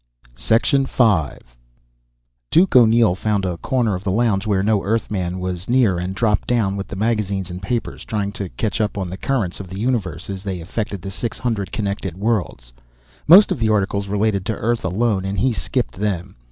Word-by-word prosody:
V 110 - +2 1.9
Duke 180 0 +3
O'Neill 115 -4 +6
found 100 +1 -1
a 90 -2 -2
corner 120 +1 0
of 90 +1 -4
the 100 - -2
lounge 110 -1 +1
where 95 -2 +1
no 105 -1 +2
Earthman 100 -4 -1
was 90 +1 -4
near 120 -8 +3
and 90 +2 -4
dropped 105 -1 +1
down 110 -6 +1
with 100 0 -4
the - - -7
magazine 100 -2 -1
and 90 +1 -7
papers, 105 -2 -3
trying 100 -2 -2
to 100 -3 -5
catch 110 +2 -2
up 105 -1 -1
on 95 -3 -3
the - - -4
currents 110 -10 -1
of 95 - -7
the 95 +2 -8
universe 105 -8 -2
as 95 -1 -5
they 95 -3 -4
affected 100 +2 -4
the 95 - -5
six 115 +3 -4
hundred 110 -6 -2
connected 100 -4 -3
worlds. 95 - -2 0.5
Most 190 +6 +8
of - - -1
the 110 -1 +1
articles 100 -1 0
related 100 -1 0
to 110 - -1
Earth 115 +2 -1
alone, 95 +1 0
and 95 +1 -3
he 125 +6 +2
skipped 125 +2 -2
them. 95 -4 -3
100 Hz, 190 wpm, -20 LUFS, 95-115 Hz, 1.9 s, Most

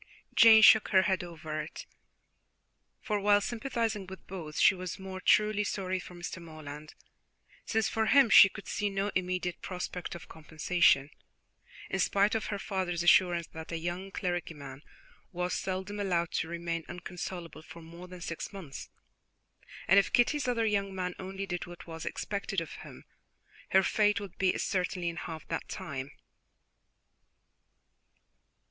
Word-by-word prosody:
Jane 220 -1 +8
shook 220 0 +8
her 190 -2 +4
head 190 -2 0
over 160 -3 -5
it, 150 - -8 1.2
for, 210 -3 -1
while 205 0 +4
sympathizing 225 -3 -2
with 190 +1 -10
both, 165 -5 -7
she - - +6
was 185 -1 -6
more 190 -1 -7
truly 210 +1 +3
sorry 185 -2 -2
for 180 - -10
Mr. 175 0 -6
Morland, 155 -2 -10 0.7
since 220 -1 +1
for 220 -1 0
him 275 0 +6
she 195 - +10
could 200 - -11
see 205 0 -1
no 195 +1 -1
immediate 180 -1 -2
prospect 180 -1 -5
of 170 - -10
compensation, 155 -2 +2 0.8
in - - -2
spite 200 +3 +2
of 225 - -1
her 205 - -2
father's 185 -3 -2
assurances 175 -1 +4
that 160 +1 -8
a 165 - -2
young 175 +3 -4
clergyman 160 -8 -4 0.5
was 180 0 -2
seldom 190 +2 -3
allowed 175 -4 0
to 160 - -1
remain 170 0 -3
inconsolable 175 -2 -7
for 165 +1 -12
more 170 +2 -11
than 180 -1 -11
six 165 -1 -5
months, 175 -9 -9 1.0
and 195 +3 +7
if 200 - 0
Kitty's 260 +3 +2
other 235 -2 +1
young 200 -2 0
man 180 -1 -2
only 195 +1 -5
did 175 -2 -4
what 175 0 -11
was 165 -1 -7
expected 200 -1 -3
of 165 -2 -6
him, - - -11 0.7
her 190 0 +5
fate 210 0 +2
would 200 -3 -9
be 185 -1 +3
a - - -4
certainty 180 -2 -1
in 170 - -6
half 160 -2 -7
that - - -4
time. 140 -7 -5
185 Hz, 155 wpm, -30 LUFS, 170-200 Hz, 1.2 s, she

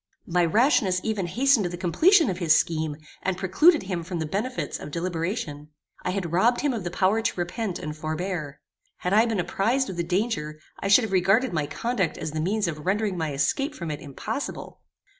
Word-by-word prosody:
My 175 0 +2
rashness 200 - +3
even 210 -5 -1
hastened 245 0 +3
the 175 0 -6
completion 320 - +4
of 180 - -5
his 160 -3 +5
scheme, 155 -2 -1 0.2
and 185 -1 -1
precluded 295 - +4
him 185 -3 -3
from 175 +1 -5
the 160 - -2
benefits 215 +11 -3
of - - -7
deliberation. 165 -2 -3 0.3
I - - -2
had 185 -3 -2
robbed 225 +8 +3
him 290 -3 +1
of 220 -5 -4
the 175 - -3
power 195 +5 +2
to 225 -4 -2
repent 185 +2 -2
and 150 0 -6
forbear. 155 -1 -4 0.4
Had 180 - -2
I 220 +3 +5
been 225 -4 -1
apprized 225 +7 0
of 180 - -8
the 170 - 0
danger, 170 -5 -2 0.2
I - - -2
should 205 +5 +6
have 220 - -3
regarded 195 +5 +3
my 150 -3 -1
conduct 230 -5 -1
as 155 - -4
the 155 0 -2
means 205 +4 0
of 155 -3 -5
rendering 200 +2 0
my 160 -3 -2
escape 275 - 0
from 170 -3 -5
it 150 - -5
impossible. 215 - -6
185 Hz, 200 wpm, -25 LUFS, 165-220 Hz, 0.4 s, should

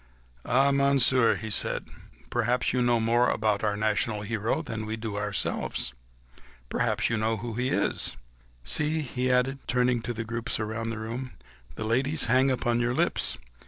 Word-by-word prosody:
"Faith, - - -7
then, 140 +2 +4
Monsieur," 135 -3 +4
he 110 0 -5
said, - - -1 0.4
"perhaps 120 +1 +1
you 125 - +1
know 120 -1 +3
more 120 +2 +3
about 110 -1 0
our 105 -1 0
national 105 0 0
hero 110 +8 -1
than 110 -6 -5
we 110 +1 -3
do 110 -2 -5
ourselves... 105 -10 -1 0.8
perchance - - 0
you 115 - +1
know 110 +1 0
who 115 +2 -5
he 125 +3 -1
is.... - - +1 0.5
See!" 155 - +1
he 130 -2 -1
added, 130 +2 +2
turning 125 0 +2
to 120 - -4
the 115 0 -4
groups 115 +1 -2
round 110 +1 -3
the 115 - -5
room, 120 +4 -5 0.4
"the 110 - -4
ladies 135 +7 +1
hang 130 +3 +4
upon 120 -2 +1
your 120 +1 0
lips - - +1
115 Hz, 170 wpm, -27 LUFS, 110-125 Hz, 0.8 s, then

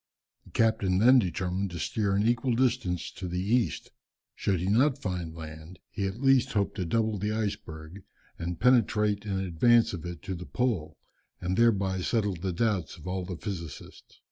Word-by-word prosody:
The - - -16
captain 110 -5 +2
then 125 +6 +7
determined 95 0 -1
to 85 - -7
steer 100 -3 0
an 100 +2 +2
equal 120 +1 +1
distance 115 -9 0
to 95 - -6
the 90 +1 -3
east. 110 +5 0 0.4
Should 95 -3 0
he 90 - -2
not 125 +8 +3
find 90 - -4
land, 80 +2 -9
he 100 -2 -2
at 95 +4 -6
least 135 -2 +4
hoped 100 -2 +1
to 90 - -1
double 110 +3 0
the 105 +2 -1
iceberg, 100 -5 -4 0.4
and 85 0 -4
penetrate 105 -4 +3
in 100 -1 -1
advance 100 +6 +3
of 85 - -5
it 85 -3 -8
to 95 - -4
the 90 0 -7
pole, 115 -11 -1 0.4
and 90 +1 -2
thereby 100 -4 +2
settle 105 0 0
the 90 +2 -3
doubts 95 -3 -1
of - - -13
all 90 0 -3
the 90 -2 -5
physicists. 85 -7 -8
100 Hz, 180 wpm, -28 LUFS, 90-115 Hz, 0.4 s, then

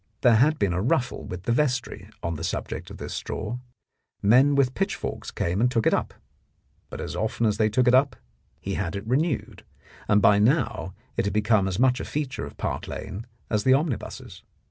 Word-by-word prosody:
There 120 -3 +6
had 150 +6 +4
been 100 -4 +1
a 90 - 0
ruffle 125 +3 0
with 90 0 -7
the 120 - 0
vestry 130 -1 -1
on 85 - -1
the 80 0 -6
subject. - - -4
of - - -9
this - - -6
straw. 110 +3 -4 0.6
Men 130 +7 +5
with 135 -2 +3
pitch 195 +5 -1
forks - - -5
came 90 +5 -1
and 125 - +4
took 115 -3 0
it - - +4
up. - - -1 0.7
But - - -7
as 75 - -5
often 110 +4 -1
as 105 -1 +1
they 110 0 +3
took 125 +4 +2
it 125 - +5
up 135 +2 +4 0.4
he - - -4
had 85 +3 -2
it 100 +1 -5
renewed, 135 +4 -1 0.4
and 105 - +4
by 100 0 +5
now 110 - +1 0.2
it - - +1
had 100 - -2
become 105 -2 +3
as 95 -1 -2
much 125 +1 +3
a - - -4
feature 145 -3 -3
of - - -13
Park - - -3
Lane 105 +5 -6 0.2
as 105 -2 0
the 130 +3 +5
omnibuses. 145 -4 -3
115 Hz, 210 wpm, -25 LUFS, 100-130 Hz, 0.7 s, There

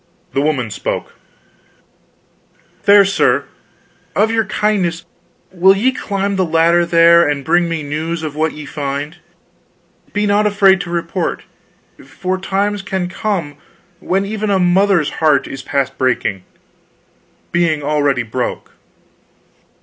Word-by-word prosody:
The 135 - +1
woman 140 -7 -1
spoke: - - -4 1.7
"Fair 200 0 +6
sir, 195 0 +1 0.7
of 220 +2 +2
your 225 -1 +1
kindness 180 -5 -1 0.5
will 190 +2 +4
ye 250 +6 +2
climb 200 -5 -3
the 190 - +2
ladder 170 +1 +2
there, 170 -1 +5
and 140 -2 -3
bring 170 +1 +2
me 165 -2 -3
news 160 +3 -4
of 150 -2 -5
what 155 +1 0
ye 150 -1 -9
find? 145 +3 -4 0.9
Be 205 0 0
not 205 +1 +2
afraid 195 -2 +4
to 175 - -7
report, 170 +1 -3 0.6
for 185 +8 -4
times 200 +2 -1
can 190 -3 -3
come 180 -8 -3 0.4
when 195 +2 -1
even 215 +1 -3
a 200 - +2
mother's 180 -2 +2
heart 155 -1 +3
is 135 - -7
past 140 0 -2
breaking 110 -7 -1 1.1
being 165 -4 +1
already 145 -3 +1
broke." 120 +2 -4
170 Hz, 125 wpm, -17 LUFS, 150-195 Hz, 1.7 s, Fair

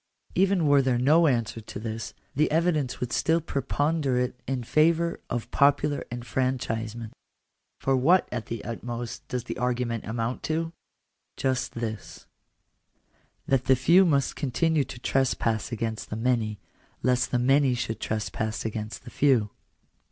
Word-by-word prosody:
Even 190 -2 +3
were 145 -1 +5
there 130 -2 +1
no 155 +7 +5
answer 115 -4 0
to 105 - -8
this, 110 0 -5 0.2
the 150 +3 +3
evidence 155 -5 +1
would 125 -1 -3
still 160 +1 +2
preponderate 140 -3 0
in 130 -2 -2
favour 165 +6 +2
of 120 -2 -3
popular 145 +1 +3
enfranchisement. 120 -2 -2 0.6
For 135 - +1
what 165 +9 +4
at 120 -3 -4
the 115 -2 -5
utmost 120 0 -5
does 125 -2 -3
the - - -6
argument 120 -2 -1
amount 115 +2 -2
to? 165 +1 -1 0.6
Just 130 -1 -1
this: 110 -4 -6 0.6
— - - -41
that 135 -2 +2
the 130 - +5
few 170 +9 +5
must 140 -6 +2
continue 150 +2 +1
to - - -9
trespass 125 -4 0
against 110 -1 -3
the - - -3
many, 115 -2 0 0.5
lest 125 -1 +2
the 125 - +1
many 135 +1 +3
should 115 -2 -3
trespass 110 +1 -3
against 110 -1 -4
the - - -10
few. 125 -8 +3
125 Hz, 145 wpm, -27 LUFS, 115-145 Hz, 0.6 s, were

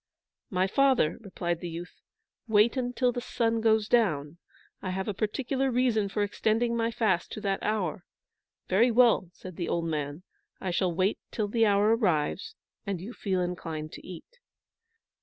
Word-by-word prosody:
"My 185 -1 +1
father," 260 - +2
replied 175 -5 -3
the 175 - -5
youth, 170 +2 -8 0.5
"wait 220 +2 +4 0.2
till 250 -1 +2
the 245 - -4
sun 230 -2 0
goes 220 -1 +3
down. 170 -10 +1 0.4
I 185 - -4
have 190 +1 -3
a 210 - -1
particular 260 +6 -1
reason 240 -5 +1
for 205 +1 0
extending 225 +3 0
my 230 0 +1
fast 215 -6 0
to 215 - -6
that 195 -2 -1
hour." 190 -5 -1 0.6
"Very 220 +7 +4
well," 235 -6 +4
said 185 -1 -11
the 175 - -2
old 170 -1 0
man. 150 0 -3 0.4
"I 185 - -3
shall 180 +1 +1
wait 185 +4 +1
till 215 -2 -2
the 225 +1 +3
hour 205 +2 +4
arrives, 215 - 0 0.3
and 200 -4 -3
you 205 +8 -7
feel 190 -5 -1
inclined 165 -3 -4
to - - -10
eat." 185 - -11
205 Hz, 165 wpm, -28 LUFS, 175-230 Hz, 0.6 s, wait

